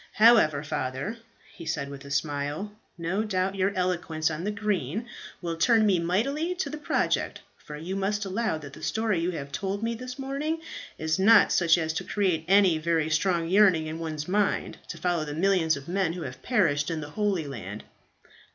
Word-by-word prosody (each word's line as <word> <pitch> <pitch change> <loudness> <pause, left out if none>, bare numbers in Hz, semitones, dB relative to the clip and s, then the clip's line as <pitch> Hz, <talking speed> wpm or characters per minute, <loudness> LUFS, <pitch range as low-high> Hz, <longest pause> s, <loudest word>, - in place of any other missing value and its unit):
However, 210 -11 +5
Father," 145 - -3 0.4
he 165 - -10
said, 140 -3 -2
with 140 -1 -9
a - - -9
smile, 145 +6 -2 0.3
"no 180 +5 -1
doubt 190 -2 0
your 195 0 +1
eloquence 170 -3 0
on 155 +2 -4
the - - 0
green 210 - -2 0.4
will 170 -1 -2
turn 220 +6 +4
me 195 -4 +3
mightily 275 - 0
to 350 -6 -3
the 305 - -5
project, - - 0
for 150 - -10
you 175 +5 -5
must 200 +1 -1
allow 210 -1 -1
that 140 -3 -10
the - - -11
story 220 -5 0
you 170 +2 0
have 140 -5 -5
told 200 +5 -3
me 230 +1 0
this 250 +2 -7
morning 280 +4 -2 0.4
is 160 +2 -1
not 215 +2 +6
such 170 -1 +4
as 160 -2 -1
to - - -3
create 180 -6 0
any 190 -4 +5
very 160 -1 0
strong 170 +1 +1
yearning 185 -4 +5
in 155 +1 -5
one's 155 -2 -4
mind 200 +2 0
to 165 - -7
follow 170 -1 0
the 150 -1 -5
millions 170 -3 +2
of 140 +2 -10
men 180 -2 0
who 175 -1 -5
have - - -7
perished 165 - +1
in 160 -2 -2
the 150 0 -8
Holy 200 -4 0
Land." 105 -7 -7
175 Hz, 195 wpm, -27 LUFS, 155-210 Hz, 0.4 s, not